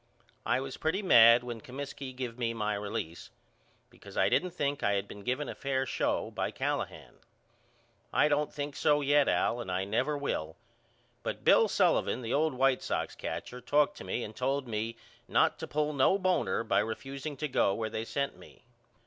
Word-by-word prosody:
I - - +2
was 135 -1 -6
pretty 185 +6 -1
mad 115 -8 +7
when 120 -2 -6
Comiskey 135 +1 -7
give 125 -2 -6
me 115 -1 -1
my 105 -1 -1
release, 100 -5 -5 0.6
because - - -13
I - - +4
didn't 180 - +2
think 145 -5 -2
I 100 - +2
had 100 0 -1
been 100 - -10
given 130 +7 -2
a - - -4
fair 135 -1 -1
show - - -1
by - - -2
Callahan. - - -4 0.9
I - - +4
don't 150 0 +1
think 145 -1 -5
so 150 -1 +3
yet 145 0 +4
Al 120 - +1
and 95 - -5
I 95 +1 -1
never 115 +9 0
will 80 - -3 0.7
but - - -5
Bill - - +6
Sullivan 125 - +2
the 115 - -2
old 155 -1 +2
White 130 0 +3
Sox - - -2
catcher 125 0 -6
talked 150 +3 +2
to - - -8
me 120 - -3
and 105 - -8
told 135 +1 -1
me 115 +1 -3 0.3
not - - +2
to - - -5
pull 150 0 -1
no 140 +7 +4
boner 180 - +1
by 100 - +2
refuseing 135 +6 -5
to 150 - -2
go 100 -7 +2
where 110 -1 -2
they 110 - -3
sent 140 +4 -2
me. - - -17
130 Hz, 190 wpm, -30 LUFS, 115-145 Hz, 0.9 s, mad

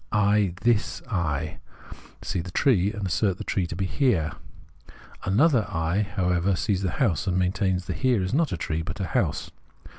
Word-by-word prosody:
I, 105 -3 +2
tins 115 -3 +1
I, 80 -5 -1 0.6
see 90 - -2
the 90 - -8
tree, 100 - +2
and 105 -3 -4
assert 95 +1 +1
the - - -6
tree 95 -3 -1
to 85 - -6
be 95 +2 -1
the - - -5
Here; 95 - +2 0.9
another 115 - +3
I, 80 +5 0
however, 90 -2 0
sees 95 +1 0
the 95 - 0
house 100 - +1
and 90 -1 +1
maintains 95 0 0
the 90 - -3
Here 110 +1 +1
is 90 - -2
not 155 +1 +2
a 90 - -2
tree 80 -1 -2
but 85 +4 -6
a 95 - -1
house. 80 - -1
95 Hz, 185 wpm, -25 LUFS, 90-105 Hz, 0.9 s, another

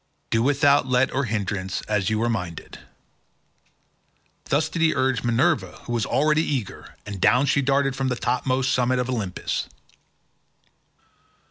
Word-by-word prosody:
Do 115 - +2
without 140 +1 +3
let 130 +1 +2
or 140 +1 0
hindrance 100 -4 -3
as 105 -3 -1
you 110 +1 0
are - - +1
minded." 90 -8 -5 1.7
Thus 150 +3 +1
did 165 +1 -4
he 160 -1 +3
urge 130 -2 +1
Minerva 130 +8 +1
who 120 - -5
was 115 -3 -1
already 150 +2 +2
eager, 130 -10 -4
and 100 -3 -7
down 125 +3 +4
she 140 0 +2
darted 135 0 +1
from 135 0 -1
the 125 - 0
topmost 130 +1 0
summits 125 0 +1
of 125 +1 -3
Olympus. 105 -7 -3
125 Hz, 145 wpm, -23 LUFS, 115-140 Hz, 1.7 s, down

